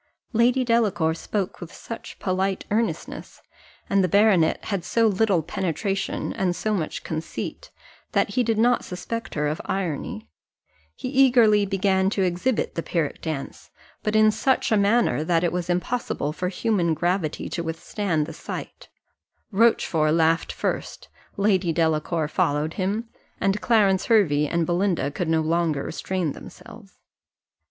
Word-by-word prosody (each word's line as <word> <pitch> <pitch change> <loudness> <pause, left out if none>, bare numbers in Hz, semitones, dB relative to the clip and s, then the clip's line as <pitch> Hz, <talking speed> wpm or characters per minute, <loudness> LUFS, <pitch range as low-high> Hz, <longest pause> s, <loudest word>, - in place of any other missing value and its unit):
Lady 245 +3 +3
Delacour 205 -9 +2
spoke 190 +4 -4
with 175 -1 -8
such 230 - -9
polite 190 0 -1
earnestness, 225 +2 -2 0.5
and 195 -1 +2
the - - +3
baronet 195 -3 +3
had 195 -4 -2
so 230 +6 +2
little 200 -4 +2
penetration 195 +4 -2
and 180 -2 0
so 215 +5 -1
much 165 -7 -3
conceit, 160 0 -5 0.4
that - - +2
he 250 - +1
did 225 -2 0
not 240 +2 +3
suspect 225 +5 -5
her 150 -1 0
of 150 +2 -2
irony: 165 - -3 0.7
he - - -6
eagerly 240 -6 +4
began 190 0 +2
to 195 -1 0
exhibit 185 +7 0
the 165 - -2
Pyrrhic 165 -3 -2
dance, 155 -4 -5 0.3
but 215 - -1
in 215 0 +6
such 260 +3 +1
a - - +5
manner 205 -5 +2
that 165 +1 +1
it 175 - +1
was 180 0 -3
impossible 180 -4 -1
for 180 +2 -2
human 180 -4 0
gravity 175 -1 -1
to 170 - -3
withstand 165 0 -2
the 165 - -8
sight - - -8 0.6
Rochfort 175 -8 +3
laughed 165 0 +2
first, - - -4 0.3
Lady 195 -4 +2
Delacour 160 0 0
followed 155 -2 0
him, 205 +4 -2 0.3
and 195 +1 0
Clarence 200 -5 +3
Hervey 155 -10 +3
and 170 +2 0
Belinda 175 -3 0
could 170 +4 -3
no 160 -1 +3
longer 160 -3 0
restrain 180 -2 -2
themselves. - - -13
185 Hz, 145 wpm, -24 LUFS, 165-215 Hz, 0.7 s, in